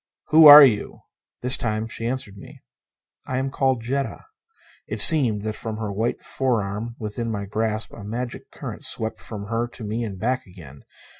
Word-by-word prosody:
"Who 155 0 +7
are 145 0 +12
you?" 110 -7 0 0.4
This 125 +1 +4
time 110 -1 -3
she 115 0 -5
answered 120 -5 -5
me. 100 - -14 0.6
"I 130 - -3
am 135 +1 -2
called 130 -3 0
Jetta." 135 - -4 0.6
It - - -5
seemed 125 - +6
that 110 0 -3
from 110 0 -6
her 110 -2 -4
white 110 +4 -2
forearm 115 -3 -3
within 115 +2 -5
my 100 -2 -4
grasp 110 +1 -3
a 105 - -11
magic 120 +4 -6
current - - -9
swept 110 0 -3
from 105 -3 -7
her 115 +1 -1
to 120 - -12
me 110 +3 -3
and 100 -4 -6
back 125 +3 -2
again. 80 -7 -14
115 Hz, 175 wpm, -22 LUFS, 105-125 Hz, 0.6 s, are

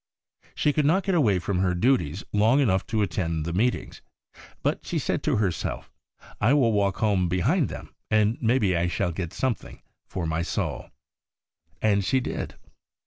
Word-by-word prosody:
She 150 - +2
could 150 -1 +2
not 185 +5 +3
get 195 - 0
away 120 - +3
from 90 +1 -1
her 90 -1 +1
duties 100 - +1
long 110 +6 +4
enough 95 -9 +2
to 110 -2 +1
attend 85 -5 -2
the 85 - -3
Meetings, 120 +7 -1 0.6
but - - 0
she - - -3
said - - -1
to - - +1
herself, 100 -5 -2 0.2
' - - -24 0.2
I 120 +7 +4
will 125 -6 +3
walk 100 -2 +1
home 100 -5 +1
behind 90 0 +1
them, - - -9 0.2
and 110 +1 +3
maybe 110 -6 +2
I 85 +1 +1
shall 85 0 -1
get 85 -1 -4
some 130 -2 0
thing - - -14 0.2
for 90 - -4
my 80 0 -1
soul.' 85 - -3 0.9
And 100 -2 +3
she 130 +7 +2
did. - - -4
100 Hz, 180 wpm, -26 LUFS, 90-120 Hz, 0.9 s, long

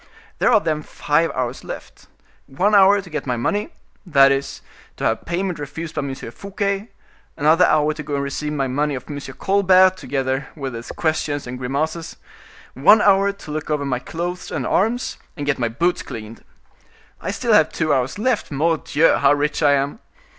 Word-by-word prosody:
There - - +3
are 220 - +6
then 155 -5 -1
five 150 +2 0
hours 125 0 -3
left. - - -9 0.4
One 190 +11 0
hour 200 0 +6
to 180 - -13
get 150 -2 -4
my 125 -1 0
money,—that 145 - +1
is, 140 0 -2 0.3
to - - -6
have 110 - 0
payment 175 0 -2
refused 155 +3 -6
by - - -3
M. 135 -1 -4
Fouquet; 200 - -4 0.5
another 160 +5 +4
hour 155 0 +2
to 150 - -7
go 145 0 -4
and 140 - -1
receive 150 +2 -3
my 140 -2 -1
money 145 +3 -1
of 125 - -7
M. 145 -2 -5 0.2
Colbert, 185 -1 +4
together 135 -3 -2
with 135 -4 -5
his 115 0 -7
questions 155 -3 -1
and 125 0 -6
grimaces; 155 +6 -3 0.6
one 190 +11 +6
hour 200 0 +4
to 200 -6 -11
look 155 0 -4
over 150 -2 0
my 125 -3 -1
clothes 175 +6 -5
and - - -3
arms, 235 +5 0 0.2
and 145 - -4
get 145 -2 0
my 120 -2 0
boots 170 +10 0
cleaned. 110 0 -9 0.8
I - - -4
still - - 0
have - - +5
two 160 -2 0
hours 130 +5 0
left. 240 +1 0
Mordioux! 160 +1 +2
how 140 0 +4
rich 145 +1 -1
I 145 - +5
am." 140 +7 -1
150 Hz, 180 wpm, -21 LUFS, 135-180 Hz, 0.8 s, are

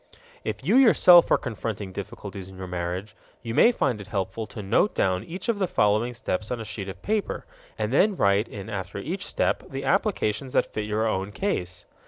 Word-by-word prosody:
If 105 +1 -4
you 200 - +4
yourself 180 -9 +7
are - - +5
confronting 110 -5 -5
difficulties 100 -1 -7
in 95 - -12
your 95 - -6
marriage, 90 +3 -4 0.3
you 115 -1 -4
may 235 - +6
find 130 - -1
it 100 - -10
helpful 100 +2 -3
to 105 +1 -8
note 115 - +2
down 95 -1 +1
each 180 +7 -7
of 230 -3 0
the 190 - +1
following 110 0 +1
steps 105 -2 -3
on 125 - -2
a 115 - -5
sheet 100 -2 -5
of 95 - -9
paper 215 -1 -1 0.3
and - - -2
then 210 -1 +4
write 100 - +2
in 100 -1 -8
after 95 -4 -5
each 175 - -4
step - - 0
the 135 0 -5
applications 135 - 0
that - - +1
fit 105 - -2
your 105 +1 0
own 95 -1 -1
case. 90 - -3
105 Hz, 205 wpm, -25 LUFS, 95-135 Hz, 0.3 s, yourself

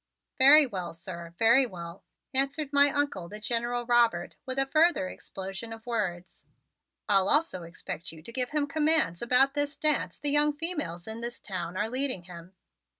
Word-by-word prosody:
"Very 285 +3 +8
well, 185 -8 -6
sir, 170 0 -9
very 235 +4 +5
well," 170 -2 -10 0.3
answered 275 +2 0
my 285 0 +5
Uncle, 285 - -1
the 210 - -7
General 240 +2 -2
Robert, 235 -7 +2
with 260 0 -3
a 270 - +3
further 310 - +2
explosion 195 +4 -8
of 225 +1 -9
words. 185 -7 -4 0.6
"I'll 195 -1 +3
also 295 - +2
expect 170 -1 -7
you 160 -1 -14
to 235 - -8
give 250 -1 0
him 300 -1 0
commands 300 - 0
about 255 +3 +3
this 290 0 -2
dance 305 -2 +1
the 290 0 +1
young 295 +1 +3
females 295 - -3
in 220 +1 -6
this 235 0 -6
town 180 -2 -6
are 210 +2 -1
leading 255 -5 -1
him." 175 +1 -13
235 Hz, 170 wpm, -28 LUFS, 185-285 Hz, 0.6 s, Very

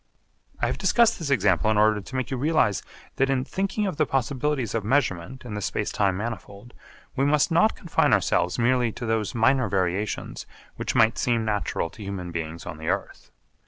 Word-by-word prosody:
I - - +1
have - - -2
discussed 235 -1 +3
this 160 -4 -4
example 110 -4 +2
in 110 - +2
order 105 0 +3
to 125 - -10
make 130 +1 -2
you 130 - -1
realise 140 - +2 0.4
that 135 0 +2
in 130 -1 0
thinking 195 +2 -2
of 185 -7 -3
the 155 - +2
possibilities 135 -1 -1
of 115 -2 -1
measurement 115 -2 -1
in 115 - -6
the 105 - -4
space - - -2
time 95 -2 +1
manifold, 105 +1 -7 0.4
we 135 - +1
must 145 +2 +3
not 215 +7 +4
confine 170 - +1
ourselves 90 - +2
merely 120 -1 +2
to 120 - -6
those 110 -2 -1
minor 130 0 +3
variations 95 +2 -2 0.3
which - - -3
might 110 0 +4
seem 115 -2 +1
natural 105 -5 -1
to 110 - -13
human 95 -3 -5
beings 85 0 -5
on 80 -1 -7
the 80 - -7
earth. - - -3
115 Hz, 195 wpm, -25 LUFS, 100-135 Hz, 0.4 s, not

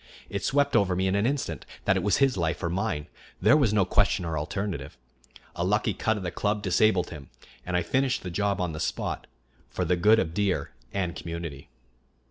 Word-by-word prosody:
It - - -3
swept 140 +1 +2
over 95 -3 +3
me 95 +1 0
in 95 - +1
an 100 +3 +2
instant 125 - -2 0.2
that 95 - +4
it 95 - +1
was 100 +1 +2
his 135 -2 +3
life 85 -1 -1
or 85 - 0
mine; 80 -5 -1 0.3
there 105 +9 +5
was 140 -9 +3
no 105 -3 +3
question 95 -1 +2
or 80 -1 -2
alternative. 85 +3 -3 0.6
A 85 - -1
lucky 105 +4 +1
cut 110 +4 0
of 100 - -5
the 90 - -2
club 105 +3 -1
disabled 95 -1 +3
him, 75 -5 -9 0.4
and 90 -1 +1
I 90 - +1
finished 130 +7 0
the 90 - -5
job 100 +2 0
on 90 -2 -1
the 75 - -6
spot, - - -3 0.4
for 90 - -2
the 90 +2 +2
good 105 +6 +5
of 80 - +1
the - - -12
deer 95 -7 0 0.2
and 90 -3 -1
the - - -6
community. 85 -6 -6
95 Hz, 220 wpm, -27 LUFS, 85-105 Hz, 0.6 s, there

